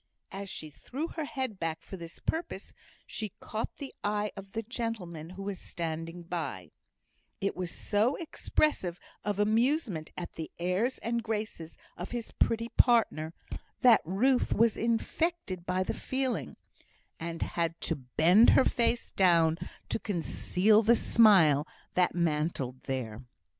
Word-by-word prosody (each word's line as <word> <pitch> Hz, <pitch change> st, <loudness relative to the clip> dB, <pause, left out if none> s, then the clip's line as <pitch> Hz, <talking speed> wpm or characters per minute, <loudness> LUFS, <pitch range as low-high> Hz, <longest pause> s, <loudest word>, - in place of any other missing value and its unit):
As 195 Hz, 0 st, -6 dB
she 155 Hz, -4 st, -6 dB
threw 280 Hz, -, -5 dB
her 320 Hz, -2 st, -4 dB
head 260 Hz, -8 st, -4 dB
back 165 Hz, -1 st, -3 dB
for -, -, -8 dB
this 170 Hz, -2 st, -9 dB
purpose, 325 Hz, +2 st, -4 dB, 0.3 s
she 215 Hz, -4 st, -5 dB
caught 220 Hz, +1 st, -4 dB
the 280 Hz, -2 st, -7 dB
eye 210 Hz, 0 st, 0 dB
of 195 Hz, 0 st, -10 dB
the 225 Hz, -, -2 dB
gentleman 205 Hz, -9 st, -4 dB
who 190 Hz, +2 st, -8 dB
was 200 Hz, -1 st, -4 dB
standing 165 Hz, +1 st, -4 dB
by; 150 Hz, -, -4 dB, 0.7 s
it 195 Hz, -, -1 dB
was 180 Hz, -1 st, -3 dB
so 215 Hz, +9 st, +1 dB
expressive 295 Hz, -, 0 dB, 0.2 s
of 205 Hz, -1 st, -1 dB
amusement 220 Hz, -, +1 dB
at 175 Hz, -, -5 dB
the 160 Hz, -, -6 dB
airs 185 Hz, +9 st, 0 dB
and 235 Hz, 0 st, 0 dB
graces 215 Hz, -7 st, -4 dB, 0.2 s
of 175 Hz, -, -5 dB
his 240 Hz, -2 st, -4 dB
pretty 230 Hz, 0 st, +1 dB
partner, 190 Hz, -12 st, +3 dB, 0.5 s
that 240 Hz, -4 st, +7 dB
Ruth 245 Hz, +10 st, +2 dB
was 230 Hz, -1 st, +4 dB
infected 230 Hz, -, -1 dB
by 185 Hz, +1 st, +1 dB
the -, -, -2 dB
feeling, 260 Hz, -1 st, -2 dB, 0.6 s
and 165 Hz, 0 st, -3 dB
had 165 Hz, -1 st, -2 dB
to 165 Hz, -, 0 dB
bend 160 Hz, -, +5 dB
her 265 Hz, -, +6 dB
face 235 Hz, 0 st, +1 dB
down 170 Hz, -3 st, +4 dB, 0.3 s
to -, -, -1 dB
conceal 205 Hz, +2 st, +2 dB
the 230 Hz, +2 st, +5 dB
smile 175 Hz, -13 st, +5 dB, 0.3 s
that 180 Hz, -1 st, +2 dB
mantled 150 Hz, -6 st, -1 dB
there. 125 Hz, -4 st, -3 dB
195 Hz, 140 wpm, -30 LUFS, 165-230 Hz, 0.7 s, that